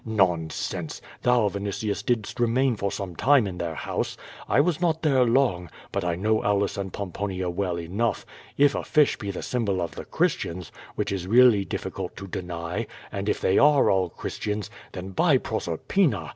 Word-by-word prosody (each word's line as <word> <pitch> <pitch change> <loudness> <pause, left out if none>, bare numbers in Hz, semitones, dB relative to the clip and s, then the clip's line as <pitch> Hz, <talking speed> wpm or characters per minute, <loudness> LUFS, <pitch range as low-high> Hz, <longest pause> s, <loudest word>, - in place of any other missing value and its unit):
Nonsense! 90 -8 -1 0.2
Thou, 125 -3 +3
Vini 100 0 -4
tius, 100 +1 -3
didst 120 -3 -1
remain 120 +2 +2
for 100 -1 -2
some 95 -3 -5
time 135 - +4
in 90 -3 -5
their 85 -2 -3
house. - - -3 0.3
I - - +4
was 165 +2 +2
not 165 -2 +1
there 135 -5 +4
long, 115 - +2 0.2
but 100 - -1
I 85 -1 0
know 110 +4 +1
Aulus 100 0 +1
and 95 -1 -4
Pomponia 95 -1 -3
well 90 -1 -2
enough. 100 +8 -1 0.3
If 145 0 +5
a - - -2
fish 150 -2 +3
be 100 - -5
the 95 - -4
symbol 105 -7 -1
of 85 -2 -3
the - - -7
Christians, 85 0 -1 0.2
which - - -1
is 95 -2 -3
really 115 -3 +6
diffi - - -4
cult - - -5
to 95 - -7
deny, 85 -2 -4 0.2
and 100 +1 -3
if - - 0
they 95 - +3
are 145 -1 +5
all 95 -2 +2
Christians, 105 +4 -4 0.2
then, 95 +1 -6
by 150 - +4
Proser 110 -9 -3
pina! 110 - +1
100 Hz, 185 wpm, -25 LUFS, 90-120 Hz, 0.3 s, really